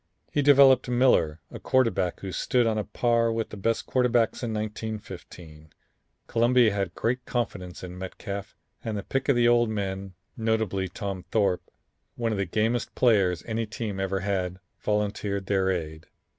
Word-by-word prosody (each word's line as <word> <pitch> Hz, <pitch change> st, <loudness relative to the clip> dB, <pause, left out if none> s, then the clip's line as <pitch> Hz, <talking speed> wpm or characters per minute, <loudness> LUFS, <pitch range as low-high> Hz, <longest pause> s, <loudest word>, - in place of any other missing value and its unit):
He 145 Hz, -, +2 dB
developed 135 Hz, -3 st, +6 dB
Miller, 120 Hz, -11 st, +3 dB
a -, -, -7 dB
quarterback 115 Hz, -9 st, +1 dB
who 95 Hz, -, -5 dB
stood 125 Hz, +7 st, +1 dB
on 110 Hz, -1 st, +1 dB
a -, -, -1 dB
par 115 Hz, +3 st, +1 dB
with 115 Hz, 0 st, -2 dB
the -, -, -8 dB
best 115 Hz, +3 st, -1 dB
quarterbacks 125 Hz, -3 st, +1 dB
in 120 Hz, -2 st, -2 dB
1915. 100 Hz, -7 st, -6 dB, 0.6 s
Columbia 120 Hz, -1 st, +3 dB
had 95 Hz, -3 st, -2 dB
great 125 Hz, +2 st, -1 dB
confidence 95 Hz, -8 st, -3 dB
in 90 Hz, 0 st, -7 dB
Metcalf, 100 Hz, +1 st, -6 dB, 0.3 s
and 110 Hz, -2 st, -3 dB
the 100 Hz, -, -4 dB
pick 135 Hz, +1 st, -2 dB
of 140 Hz, -, +5 dB
the 120 Hz, 0 st, +4 dB
old 120 Hz, -1 st, +4 dB
men, 95 Hz, -2 st, -4 dB, 0.2 s
notably 110 Hz, -4 st, 0 dB
Tom 95 Hz, 0 st, -5 dB
Thorp, 100 Hz, -5 st, +2 dB, 0.5 s
one 115 Hz, -1 st, -1 dB
of 105 Hz, -, -2 dB
the 100 Hz, -, +1 dB
gamest 110 Hz, +6 st, 0 dB
players 100 Hz, -8 st, +3 dB
any 115 Hz, 0 st, -2 dB
team 105 Hz, -2 st, -4 dB
ever 95 Hz, 0 st, -1 dB
had, 95 Hz, -2 st, -1 dB, 0.2 s
volunteered 100 Hz, -1 st, -1 dB
their 95 Hz, -1 st, +1 dB
aid. 80 Hz, -4 st, -3 dB
105 Hz, 160 wpm, -26 LUFS, 95-115 Hz, 0.6 s, developed